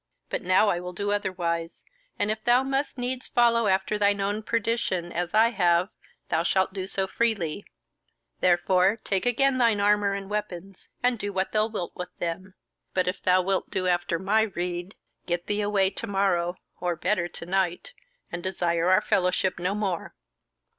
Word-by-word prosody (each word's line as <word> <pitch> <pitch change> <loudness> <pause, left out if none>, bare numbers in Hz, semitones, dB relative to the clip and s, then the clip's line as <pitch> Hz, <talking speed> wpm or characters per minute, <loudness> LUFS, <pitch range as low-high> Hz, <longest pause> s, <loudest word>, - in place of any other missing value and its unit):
But - - -1
now 185 +4 +4
I 175 - 0
will 180 0 -6
do 205 +3 -2
otherwise, 170 -4 -2 0.3
and 205 +1 +1
if 215 0 -4
thou 245 +2 +4
must 270 +1 -2
needs 250 +1 -3
follow 235 -2 +3
after 195 +2 +1
thine 200 0 +3
own 205 +2 -1
perdition, 215 -6 -1
as 175 +3 -2
I 225 +2 +6
have, 175 -2 +2 0.4
thou 160 - +2
shalt 190 +2 +1
do 190 -1 -4
so 195 0 0
freely; 200 -4 -1 0.7
therefore 185 +3 +3
take 195 +4 0
again 260 +2 +2
thine 230 -4 +3
armour 205 -1 +3
and 195 -1 -6
weapons, 195 -2 -5
and 245 -2 +2
do 205 0 -3
what 190 0 -1
thou 215 0 +2
wilt 210 -6 -5
with 180 0 -5
them. 185 +3 -4 0.4
But 185 -1 +1
if 180 - -2
thou 185 0 +3
wilt 195 +1 -1
do 185 - -2
after 175 -1 +1
my 200 +5 +2
rede, 180 -2 -3 0.3
get 175 0 -1
thee 205 0 -1
away 200 -2 +2
to 230 - -5
morrow, 190 -3 +1 0.2
or 175 -1 -1
better, 180 +1 0
to 170 - -9
night, 190 - -1 0.4
and 170 - -4
desire 175 -2 0
our 185 - +5
fellowship 185 -2 +1
no 180 +3 -1
more." 195 -5 -3
195 Hz, 175 wpm, -26 LUFS, 180-210 Hz, 0.7 s, I